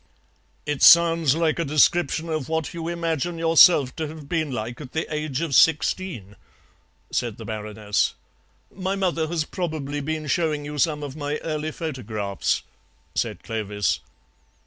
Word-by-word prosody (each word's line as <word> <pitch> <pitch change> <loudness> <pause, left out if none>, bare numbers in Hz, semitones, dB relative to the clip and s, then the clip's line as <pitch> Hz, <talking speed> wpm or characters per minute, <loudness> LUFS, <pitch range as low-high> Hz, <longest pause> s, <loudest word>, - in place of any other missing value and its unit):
"It 150 -2 -2
sounds 165 -4 +6
like 165 0 +1
a - - +2
description 160 +2 +2
of 155 -4 -3
what 160 -2 -2
you 165 -1 -5
imagine 170 -1 -2
yourself 165 -4 +5
to 160 -2 -2
have 155 -1 -10
been 160 -1 -1
like 120 +2 -5
at 130 -4 -10
the 160 - -1
age 150 -2 -2
of 165 -4 -2
sixteen," 150 - +2 0.7
said - - -2
the - - -9
Baroness. 105 -1 -1 0.6
"My 190 +1 -2
mother 175 -5 0
has 165 -1 -1
probably 155 -5 -4
been 155 +1 -3
showing 150 0 0
you 150 0 -5
some 150 -1 +1
of 140 -1 -6
my 145 -1 -3
early 155 -1 -3
photographs," 110 - -3 0.5
said - - -2
Clovis. 105 -4 -1
155 Hz, 145 wpm, -24 LUFS, 135-165 Hz, 0.7 s, sounds